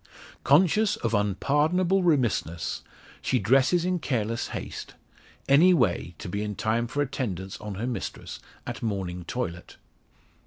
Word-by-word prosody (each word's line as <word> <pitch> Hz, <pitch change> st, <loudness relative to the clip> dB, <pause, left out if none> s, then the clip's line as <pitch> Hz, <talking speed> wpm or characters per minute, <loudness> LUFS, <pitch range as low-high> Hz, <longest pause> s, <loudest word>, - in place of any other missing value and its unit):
Conscious 190 Hz, +8 st, +4 dB
of 115 Hz, -1 st, -2 dB
unpardonable 150 Hz, -, +2 dB
remissness, 120 Hz, -, 0 dB, 0.4 s
she 130 Hz, -, +1 dB
dresses 135 Hz, -, +3 dB
in 180 Hz, -1 st, 0 dB
careless 115 Hz, -6 st, -1 dB
haste -, -, -7 dB, 0.5 s
any 170 Hz, +7 st, +6 dB
way, 90 Hz, -, 0 dB
to -, -, -7 dB
be 100 Hz, +4 st, -3 dB
in 105 Hz, -1 st, -3 dB
time 115 Hz, +3 st, 0 dB
for 145 Hz, +5 st, 0 dB
attendance 100 Hz, -9 st, -4 dB
on 105 Hz, -2 st, -5 dB
her 110 Hz, +5 st, -3 dB
mistress, 125 Hz, -2 st, -5 dB, 0.3 s
at -, -, -5 dB
morning 95 Hz, -5 st, -3 dB
toilet. 90 Hz, -8 st, -5 dB
120 Hz, 130 wpm, -27 LUFS, 100-150 Hz, 0.5 s, any